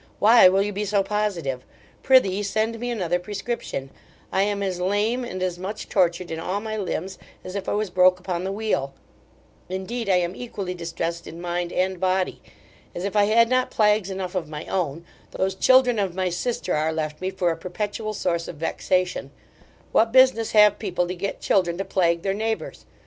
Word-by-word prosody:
Why 220 Hz, -2 st, +7 dB
will 195 Hz, +1 st, +3 dB
you 205 Hz, 0 st, -3 dB
be 205 Hz, +2 st, -2 dB
so 200 Hz, -1 st, +2 dB
positive? 190 Hz, -11 st, -2 dB, 0.4 s
Prithee 205 Hz, -7 st, +4 dB
send 220 Hz, +3 st, -1 dB
me 245 Hz, +1 st, -3 dB
another 180 Hz, -7 st, 0 dB
prescription 200 Hz, -, -5 dB, 0.4 s
I 190 Hz, -, +2 dB
am 200 Hz, 0 st, 0 dB
as 185 Hz, -2 st, -2 dB
lame 210 Hz, +6 st, +1 dB
and 185 Hz, -6 st, -4 dB
as 180 Hz, -1 st, -2 dB
much 200 Hz, +3 st, -6 dB
tortured 175 Hz, -2 st, +1 dB
in 160 Hz, -, -3 dB
all 185 Hz, +4 st, -2 dB
my 215 Hz, 0 st, -4 dB
limbs 190 Hz, -2 st, -4 dB, 0.2 s
as 185 Hz, -, -7 dB
if 200 Hz, -1 st, -4 dB
I -, -, 0 dB
was 205 Hz, -2 st, -1 dB
broke 185 Hz, 0 st, +4 dB
upon 180 Hz, -1 st, -3 dB
the 190 Hz, -, -2 dB
wheel: 195 Hz, -10 st, -2 dB, 0.7 s
indeed, 200 Hz, +4 st, -4 dB
I 190 Hz, -, +5 dB
am 180 Hz, 0 st, 0 dB
equally 200 Hz, -6 st, -5 dB
distressed 170 Hz, -1 st, -4 dB
in 165 Hz, -, -9 dB
mind 175 Hz, 0 st, -3 dB
and 185 Hz, 0 st, 0 dB
body 185 Hz, 0 st, 0 dB, 0.5 s
As 175 Hz, -, -3 dB
if 200 Hz, -, -3 dB
I 205 Hz, -1 st, +5 dB
had 230 Hz, +2 st, +4 dB
not 255 Hz, +1 st, +1 dB
plagues 210 Hz, -2 st, +2 dB
enough 190 Hz, -1 st, -4 dB
of 175 Hz, -5 st, -3 dB
my 150 Hz, 0 st, -6 dB
own, 170 Hz, -3 st, -2 dB, 0.2 s
those 190 Hz, 0 st, -1 dB
children 250 Hz, +3 st, +4 dB
of 190 Hz, -3 st, -1 dB
my 185 Hz, -1 st, 0 dB
sister 180 Hz, 0 st, -2 dB
are 155 Hz, +1 st, +1 dB
left 155 Hz, -1 st, -4 dB
me 185 Hz, -, -1 dB
for 185 Hz, -2 st, 0 dB
a -, -, -2 dB
perpetual 210 Hz, +5 st, -4 dB
source 170 Hz, -3 st, -1 dB
of -, -, -7 dB
vexation 180 Hz, 0 st, -1 dB, 0.6 s
what 225 Hz, 0 st, +3 dB
business 260 Hz, -3 st, +4 dB
have 210 Hz, -1 st, +6 dB
people 180 Hz, -4 st, -1 dB
to -, -, -1 dB
get 200 Hz, +3 st, -4 dB
children 175 Hz, -3 st, +1 dB
to 195 Hz, -, -3 dB
plague 170 Hz, -2 st, +1 dB
their 195 Hz, -1 st, 0 dB
neighbours? 220 Hz, +2 st, -4 dB
190 Hz, 195 wpm, -24 LUFS, 175-210 Hz, 0.7 s, Why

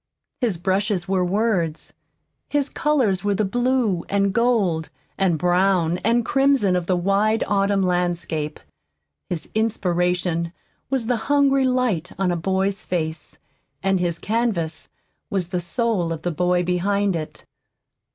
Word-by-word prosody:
His 230 Hz, -9 st, 0 dB
brushes 190 Hz, +1 st, 0 dB
were 190 Hz, -1 st, +1 dB
words, 180 Hz, -4 st, -1 dB, 0.6 s
his 290 Hz, -1 st, 0 dB
colors 245 Hz, -11 st, +1 dB
were 205 Hz, -1 st, +1 dB
the 210 Hz, +2 st, +1 dB
blue 245 Hz, -4 st, +1 dB
and 200 Hz, -1 st, +1 dB
gold 210 Hz, -9 st, +1 dB, 0.3 s
and 185 Hz, -4 st, +1 dB
brown 180 Hz, 0 st, +2 dB
and 235 Hz, +1 st, +1 dB
crimson 270 Hz, -9 st, +3 dB
of 175 Hz, -1 st, -1 dB
the 185 Hz, -, +2 dB
wide 200 Hz, +5 st, +2 dB
autumn 200 Hz, -1 st, +2 dB
landscape, 175 Hz, -4 st, -1 dB, 0.7 s
his 175 Hz, -3 st, -3 dB
inspiration 180 Hz, -5 st, 0 dB, 0.4 s
was 265 Hz, -3 st, 0 dB
the 245 Hz, +1 st, +1 dB
hungry 275 Hz, -2 st, +4 dB
light 250 Hz, -10 st, 0 dB
on 190 Hz, -1 st, +1 dB
a -, -, 0 dB
boy's 190 Hz, +3 st, -1 dB
face, 160 Hz, -3 st, -4 dB, 0.5 s
and 195 Hz, -1 st, +2 dB
his 175 Hz, -2 st, -1 dB
canvas 200 Hz, -9 st, -2 dB, 0.4 s
was 185 Hz, -3 st, -2 dB
the 180 Hz, -1 st, -1 dB
soul 190 Hz, -2 st, 0 dB
of 160 Hz, -1 st, -5 dB
the 175 Hz, -, -1 dB
boy 180 Hz, +2 st, +1 dB
behind 195 Hz, +2 st, +1 dB
it. 155 Hz, -1 st, -6 dB
190 Hz, 135 wpm, -22 LUFS, 175-220 Hz, 0.7 s, hungry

